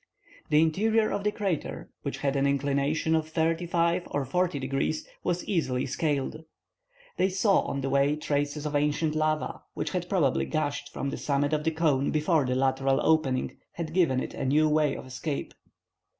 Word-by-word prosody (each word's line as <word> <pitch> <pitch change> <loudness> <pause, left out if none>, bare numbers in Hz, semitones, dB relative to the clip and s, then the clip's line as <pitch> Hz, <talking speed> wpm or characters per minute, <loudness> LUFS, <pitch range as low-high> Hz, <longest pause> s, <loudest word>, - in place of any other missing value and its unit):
The 150 +1 +5
interior 215 +7 +2
of 200 - -2
the 210 - +2
crater, 195 -7 -3
which - - -4
had 140 -1 -1
an 140 0 +2
inclination 140 +3 +1
of 160 -1 +1
thirty 165 +2 0
five 170 +1 +1
or 140 -2 -1
forty 180 +3 0
degrees, 135 +3 -2 0.2
was 175 0 -1
easily 130 -9 0
scaled. 145 +2 -2 0.7
They 190 - +3
saw 195 +2 +3
on 140 - -3
the 135 - -2
way 140 +2 +3
traces 145 0 -2
of 150 0 -2
ancient 150 +2 +1
lava, 155 0 -1
which - - -2
had 180 -2 -3
probably 155 -9 +2
gushed 145 -2 -2
from 140 - -3
the - - -4
summit 145 +1 0
of 150 0 0
the - - +4
cone 155 -4 +1
before 155 -1 +2
the 125 - 0
lateral 135 +1 +2
opening 145 -5 +1
had 160 -2 -5
given 165 -8 +3
it - - -4
a - - -4
new 150 +4 +3
way 150 -1 +2
of - - -8
escape. 130 +3 -4
150 Hz, 180 wpm, -28 LUFS, 140-165 Hz, 0.7 s, The